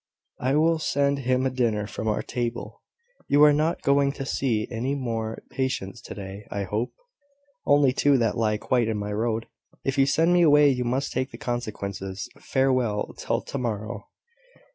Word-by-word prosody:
"I 130 Hz, +2 st, +1 dB
will 160 Hz, +2 st, +3 dB
send 140 Hz, -2 st, +1 dB
him 130 Hz, 0 st, +1 dB
a 130 Hz, -, +1 dB
dinner 115 Hz, -5 st, 0 dB
from 110 Hz, +1 st, -5 dB
our 105 Hz, -, 0 dB
table. 120 Hz, -1 st, -4 dB, 0.5 s
You 145 Hz, +1 st, +5 dB
are 150 Hz, -1 st, +7 dB
not 155 Hz, +3 st, 0 dB
going 140 Hz, 0 st, +3 dB
to 135 Hz, -2 st, -5 dB
see 120 Hz, -5 st, 0 dB
any 125 Hz, +4 st, -1 dB
more 115 Hz, -4 st, -3 dB
patients 130 Hz, -8 st, -3 dB
to -, -, -9 dB
day, 100 Hz, 0 st, -8 dB
I 100 Hz, -, -3 dB
hope?" 105 Hz, +5 st, -2 dB, 0.8 s
"Only 145 Hz, -2 st, +5 dB
two 140 Hz, +1 st, +3 dB
that 115 Hz, -3 st, +1 dB
lie 110 Hz, -2 st, +1 dB
quite 120 Hz, +1 st, +1 dB
in 110 Hz, -1 st, -1 dB
my 105 Hz, 0 st, -3 dB
road. 115 Hz, +1 st, -1 dB, 0.4 s
If 135 Hz, +1 st, 0 dB
you 135 Hz, -, +5 dB
send 165 Hz, +5 st, +3 dB
me 175 Hz, -, +5 dB
away, 150 Hz, -3 st, +6 dB
you 125 Hz, -2 st, 0 dB
must 130 Hz, +3 st, -1 dB
take 130 Hz, +1 st, -1 dB
the -, -, -10 dB
consequences. 100 Hz, -5 st, -4 dB
Farewell, 130 Hz, -6 st, 0 dB
till -, -, -1 dB
tomorrow." 115 Hz, -4 st, -4 dB
125 Hz, 175 wpm, -25 LUFS, 110-140 Hz, 0.8 s, are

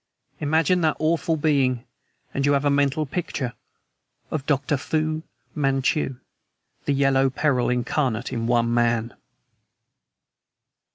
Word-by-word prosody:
Imagine 160 Hz, +4 st, +2 dB
that 155 Hz, -2 st, +2 dB
awful 160 Hz, 0 st, +1 dB
being, 135 Hz, -5 st, +1 dB, 0.5 s
and 140 Hz, -, -1 dB
you 145 Hz, +1 st, +3 dB
have 140 Hz, +1 st, +1 dB
a 145 Hz, -, +4 dB
mental 140 Hz, +2 st, +2 dB
picture 135 Hz, -5 st, -3 dB, 0.8 s
of 155 Hz, -4 st, -2 dB
Dr. 145 Hz, +1 st, +1 dB
Fu 155 Hz, +2 st, -1 dB, 0.3 s
Manchu, 135 Hz, -1 st, 0 dB, 0.7 s
the 145 Hz, -, +1 dB
yellow 135 Hz, -1 st, +3 dB
peril 130 Hz, -2 st, +1 dB
incarnate 125 Hz, -1 st, -1 dB
in 115 Hz, -1 st, -2 dB
one 120 Hz, -1 st, +2 dB
man." 120 Hz, -1 st, +1 dB
140 Hz, 115 wpm, -24 LUFS, 125-155 Hz, 0.8 s, a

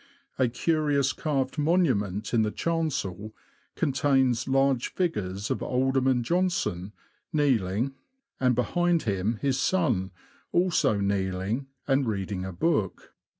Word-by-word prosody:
A 130 Hz, -, +4 dB
curious 140 Hz, +1 st, +1 dB
carved 145 Hz, -1 st, -2 dB
monument 125 Hz, -, +1 dB
in 115 Hz, -, +4 dB
the 110 Hz, -, +1 dB
chancel 110 Hz, -, -2 dB, 0.4 s
contains 135 Hz, -4 st, +1 dB
large 135 Hz, -2 st, +2 dB
figures 105 Hz, -, -2 dB
of -, -, -1 dB
Alderman 130 Hz, -1 st, +1 dB
Johnston, 115 Hz, -, -1 dB, 0.4 s
kneeling, 130 Hz, -, +1 dB, 0.5 s
and 125 Hz, -2 st, +3 dB
behind 175 Hz, +7 st, +1 dB
him 105 Hz, +1 st, -1 dB
his 135 Hz, -2 st, +1 dB
son, 125 Hz, -, +1 dB, 0.4 s
also 170 Hz, -, +2 dB
kneeling, 100 Hz, +5 st, -1 dB, 0.2 s
and 135 Hz, -2 st, +2 dB
reading 100 Hz, -3 st, -2 dB
a 95 Hz, -, -5 dB
book. 105 Hz, -, -1 dB
130 Hz, 110 wpm, -27 LUFS, 105-150 Hz, 0.5 s, A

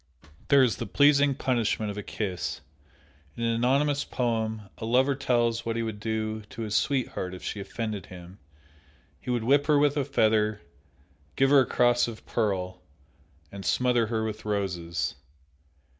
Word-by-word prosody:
There 140 Hz, -1 st, +6 dB
is 120 Hz, -4 st, +1 dB
the -, -, -4 dB
pleasing 145 Hz, -1 st, +4 dB
punishment 115 Hz, -5 st, 0 dB
of 100 Hz, -, -9 dB
a -, -, -3 dB
kiss. 95 Hz, -3 st, -4 dB, 0.8 s
In 115 Hz, -, -3 dB
an 115 Hz, 0 st, +1 dB
anonymous 140 Hz, +5 st, +2 dB
poem, 110 Hz, -3 st, -2 dB, 0.2 s
a -, -, -7 dB
lover 130 Hz, +5 st, +3 dB
tells 120 Hz, -4 st, 0 dB
what 115 Hz, 0 st, -2 dB
he 115 Hz, -, -1 dB
would 110 Hz, -2 st, -5 dB
do 110 Hz, 0 st, -2 dB
to 110 Hz, +2 st, -8 dB
his 105 Hz, -2 st, -4 dB
sweetheart 115 Hz, -8 st, -1 dB
if 90 Hz, -, -11 dB
she 105 Hz, -, -4 dB
offended 105 Hz, -1 st, -5 dB
him; 90 Hz, +1 st, -12 dB, 0.8 s
he -, -, -9 dB
would 120 Hz, -2 st, 0 dB
whip 140 Hz, +4 st, +3 dB
her 150 Hz, -2 st, +4 dB
with 145 Hz, 0 st, +3 dB
a 145 Hz, -, +2 dB
feather, 110 Hz, -6 st, +2 dB, 0.8 s
give 135 Hz, 0 st, +3 dB
her 145 Hz, -, +8 dB
a 130 Hz, -, +2 dB
cross 120 Hz, 0 st, +3 dB
of 115 Hz, -2 st, -9 dB
pearl, 95 Hz, -5 st, -2 dB, 0.7 s
and 100 Hz, -1 st, -8 dB
smother 125 Hz, -1 st, +2 dB
her 110 Hz, -1 st, -1 dB
with 110 Hz, -1 st, -4 dB
roses. 85 Hz, -9 st, -2 dB
115 Hz, 165 wpm, -27 LUFS, 105-130 Hz, 0.8 s, her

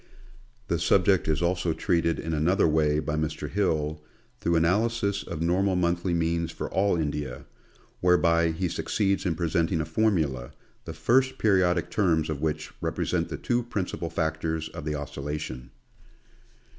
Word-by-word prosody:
The -, -, 0 dB
subject -, -, +3 dB
is 80 Hz, +2 st, +1 dB
also 85 Hz, -1 st, +1 dB
treated 85 Hz, 0 st, +1 dB
in 80 Hz, -, -3 dB
another 85 Hz, +6 st, +3 dB
way 75 Hz, -1 st, +2 dB
by 75 Hz, 0 st, -1 dB
Mr. 75 Hz, -1 st, -2 dB
Hill, 80 Hz, -4 st, -1 dB, 0.4 s
through 85 Hz, 0 st, +1 dB
analysis 100 Hz, +4 st, +1 dB
of 80 Hz, -, -5 dB
normal 95 Hz, +3 st, +2 dB
monthly 85 Hz, 0 st, +1 dB
means 85 Hz, 0 st, 0 dB
for -, -, -5 dB
all 100 Hz, -1 st, +2 dB
India, 75 Hz, -5 st, -3 dB, 0.5 s
whereby 85 Hz, -2 st, +3 dB
he 80 Hz, +3 st, -1 dB
suc -, -, -4 dB
ceeds 100 Hz, -2 st, +1 dB
in 85 Hz, -, 0 dB
presenting 85 Hz, 0 st, 0 dB
a 80 Hz, -, -1 dB
formula, 80 Hz, -, 0 dB, 0.3 s
the 80 Hz, -, -6 dB
first 130 Hz, +10 st, +2 dB
periodic 95 Hz, -5 st, +2 dB
terms 80 Hz, -6 st, +1 dB
of 70 Hz, -2 st, -4 dB
which 80 Hz, 0 st, -2 dB
represent -, -, -1 dB
the -, -, -4 dB
two 120 Hz, 0 st, 0 dB
principal 95 Hz, -7 st, -3 dB
factors 80 Hz, -1 st, -2 dB
of 75 Hz, -, -8 dB
the 75 Hz, -1 st, -1 dB
oscillation. 70 Hz, -3 st, -5 dB
85 Hz, 150 wpm, -27 LUFS, 80-90 Hz, 0.5 s, subject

